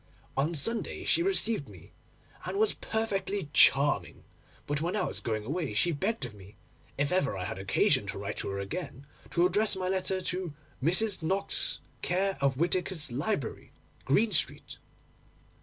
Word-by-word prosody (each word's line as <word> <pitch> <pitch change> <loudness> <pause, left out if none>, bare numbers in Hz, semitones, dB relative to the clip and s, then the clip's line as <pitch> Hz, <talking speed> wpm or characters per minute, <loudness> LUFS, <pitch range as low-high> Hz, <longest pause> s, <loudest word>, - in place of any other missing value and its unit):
On 150 +5 +1
Sunday 225 - -1
she - - +3
received 230 - +2
me, 90 -5 -14 0.5
and 190 +2 -3
was 215 0 +3
perfectly 200 -6 -2
charming; 140 +2 +4 0.4
but 145 0 -1
when 175 +4 -1
I 205 - +1
was - - -2
going 110 -2 -2
away 150 -1 -2
she 145 +12 +3
begged 190 - -1
of 120 - -8
me, 100 +1 -14 0.4
if 140 +4 +1
I - - +5
ever 140 - 0
had 90 +1 -4
occasion 95 -1 +2
to - - -4
write - - -4
to - - -3
her 100 - -3
again, 135 - -5 0.2
to 175 - +3
address 205 +4 +2
my 185 -1 -2
letter 190 0 0
to 180 -3 -3 0.3
"Mrs. 185 +5 +2
Knox, 190 +5 0 0.2
care 190 +2 +1
of 135 -2 +2
Whittaker's 170 -2 0
Library, 140 - -2 0.3
Green 210 +11 +3
Street." 170 - -1
170 Hz, 160 wpm, -30 LUFS, 140-195 Hz, 0.5 s, I